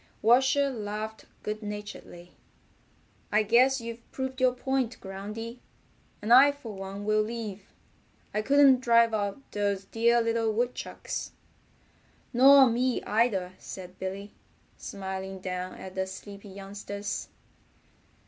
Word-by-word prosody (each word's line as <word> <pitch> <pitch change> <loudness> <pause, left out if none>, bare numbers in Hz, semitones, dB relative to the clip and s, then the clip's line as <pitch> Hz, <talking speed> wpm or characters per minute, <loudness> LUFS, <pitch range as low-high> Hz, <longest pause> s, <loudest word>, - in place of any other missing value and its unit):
Washer 265 +4 +4
laughed 215 -1 -5 0.2
good 215 +1 -3
naturedly. 205 -4 -8 1.0
"I 215 +1 +4
guess 255 +5 +4
you've 230 0 -8
proved 260 0 -4
your 255 -1 +4
point, 260 -2 -1
Groundy, 210 +5 -7 0.6
and 225 +3 +4
I 275 +3 +9
for 235 -6 -9
one 195 +1 -7
will 215 0 +3
leave. 215 -3 -5 0.6
I 215 - +1
couldn't 275 +1 +5
drive 235 -2 +4
out 205 +1 -1
those 200 -1 -1
dear 235 +3 +3
little 230 -1 +1
woodchucks." 240 +3 -3 1.0
"Nor 270 +2 +8
me 250 +2 0
either," 205 -4 +1
said 185 -1 -9
Billy, 195 +2 -5 0.4
smiling 190 0 -6
down 185 0 -4
at 190 - -9
the 190 0 -2
sleepy 200 +2 -10
youngsters. 200 +1 -6
215 Hz, 120 wpm, -28 LUFS, 195-240 Hz, 1.0 s, I